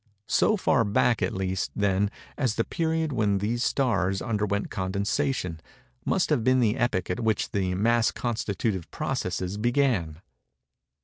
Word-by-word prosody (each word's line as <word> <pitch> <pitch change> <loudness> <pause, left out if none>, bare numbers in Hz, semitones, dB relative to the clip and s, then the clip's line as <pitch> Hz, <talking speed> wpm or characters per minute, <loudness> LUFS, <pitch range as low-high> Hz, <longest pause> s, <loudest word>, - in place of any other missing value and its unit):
So 215 - +3
far 135 - +3
back 110 +2 +2
at - - +1
least, 95 -1 -2
then, 100 0 +1 0.3
as 125 -6 0
the 115 - +1
period 160 0 -1
when 105 -4 +2
these 115 +5 -1
stars 100 -8 +1
underwent 105 -3 -1
condensation, 100 - -1 0.5
must 175 -4 +1
have 135 -7 +2
been 130 +2 +4
the 115 -2 +2
epoch 105 -8 0
at 90 - -2
which 110 -2 0
the 95 -2 0
mass 115 +3 +3
constitutive 110 -5 -2
processes 95 +2 -3
began. 120 - +1
110 Hz, 140 wpm, -26 LUFS, 95-125 Hz, 0.5 s, been